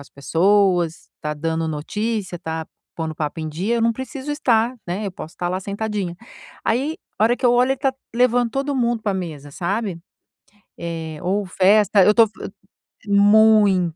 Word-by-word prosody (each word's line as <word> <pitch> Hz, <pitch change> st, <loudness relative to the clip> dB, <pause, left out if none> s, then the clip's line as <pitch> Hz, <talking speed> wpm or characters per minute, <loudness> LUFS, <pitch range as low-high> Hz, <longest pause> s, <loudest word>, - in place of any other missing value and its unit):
as 140 Hz, -, -14 dB
pessoas, 175 Hz, +3 st, +1 dB
tá 150 Hz, -, -2 dB
dando 160 Hz, +2 st, -2 dB
notícia, 195 Hz, +5 st, -3 dB
tá 160 Hz, -1 st, -5 dB, 0.3 s
pondo 160 Hz, -1 st, -3 dB
o -, -, -12 dB
papo 155 Hz, +1 st, -3 dB
em 155 Hz, -, -4 dB
dia, 190 Hz, +10 st, -1 dB
eu 230 Hz, -, 0 dB
não 230 Hz, 0 st, +3 dB
preciso 260 Hz, +3 st, -6 dB
estar, 245 Hz, -4 st, +1 dB
né, 190 Hz, +5 st, -3 dB
eu 195 Hz, -, -3 dB
posso 165 Hz, -1 st, -9 dB
tá 175 Hz, -, -1 dB
lá 185 Hz, -, -1 dB
sentadinha". 200 Hz, -2 st, -3 dB, 0.5 s
Aí 275 Hz, +8 st, 0 dB, 0.2 s
a 215 Hz, -, +4 dB
hora 235 Hz, -, +4 dB
que -, -, +1 dB
eu 240 Hz, -, +5 dB
olho, 250 Hz, +2 st, +3 dB
ele 270 Hz, -, -5 dB
tá 270 Hz, -1 st, 0 dB, 0.2 s
levando 245 Hz, 0 st, +2 dB
todo 275 Hz, +3 st, -2 dB
mundo 240 Hz, -2 st, 0 dB
pra 205 Hz, -2 st, -1 dB
mesa, 155 Hz, -6 st, -6 dB
sabe, 190 Hz, +3 st, -2 dB, 0.8 s
eh, 165 Hz, -2 st, -5 dB
ou 195 Hz, +3 st, -1 dB
festa, 200 Hz, +2 st, +4 dB
eu 210 Hz, -, +6 dB
tô 230 Hz, 0 st, +6 dB, 0.8 s
muito. 205 Hz, -4 st, +5 dB
200 Hz, 175 wpm, -21 LUFS, 170-230 Hz, 0.8 s, eu